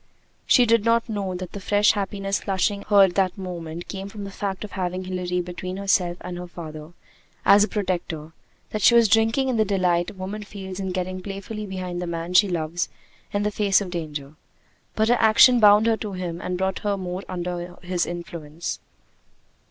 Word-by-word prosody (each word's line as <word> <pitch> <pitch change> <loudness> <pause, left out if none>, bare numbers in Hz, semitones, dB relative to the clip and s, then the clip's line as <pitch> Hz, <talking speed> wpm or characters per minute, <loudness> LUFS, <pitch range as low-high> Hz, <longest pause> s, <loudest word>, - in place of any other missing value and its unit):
She 245 - +6
did 230 -2 +3
not 230 +1 +2
know 200 -4 -3
that 180 -1 -6
the 200 - -6
fresh 205 +2 +3
happiness 195 -1 -2
flushing 200 +1 0
her 200 -2 +7
at 190 -2 +3
that 190 0 +1
moment 175 -3 -6
came 195 0 -6
from 205 0 -8
the 200 - -6
fact 195 0 -4
of 210 - -7
having 185 -1 -3
Hilary 180 -1 -2
between 180 +1 -6
herself 185 -3 +1
and 175 0 -6
her 180 - -6
father 155 -2 -9 0.5
as 205 +1 +7
a - - +1
protector; 175 -7 -3 0.4
that 215 - -3
she 235 - +6
was 235 -1 +6
drinking 225 +5 +3
in 255 -3 0
the 220 - +4
delight 180 -3 +1
a - - -10
woman 190 +3 -5
feels 195 -2 -8
in 190 -1 -3
getting 185 0 -3
playfully 200 +2 -6
behind 185 -2 -4
the 180 - -3
man 170 +1 -4
she 205 +3 +6
loves 170 -1 -2 0.4
in 205 0 0
the 210 - 0
face 205 -2 +3
of 195 -3 -5
danger: 150 -4 -5 0.6
but 220 0 +2
her 245 +1 +4
action 230 +3 +7
bound 210 0 +7
her 225 -1 +3
to 210 -3 -5
him 175 -2 -4
and 180 0 -3
brought 190 0 -1
her 205 -1 -1
more 180 0 -4
under 175 0 -4
his 180 -1 -1
influence. 170 -2 -6
190 Hz, 200 wpm, -24 LUFS, 175-205 Hz, 0.6 s, her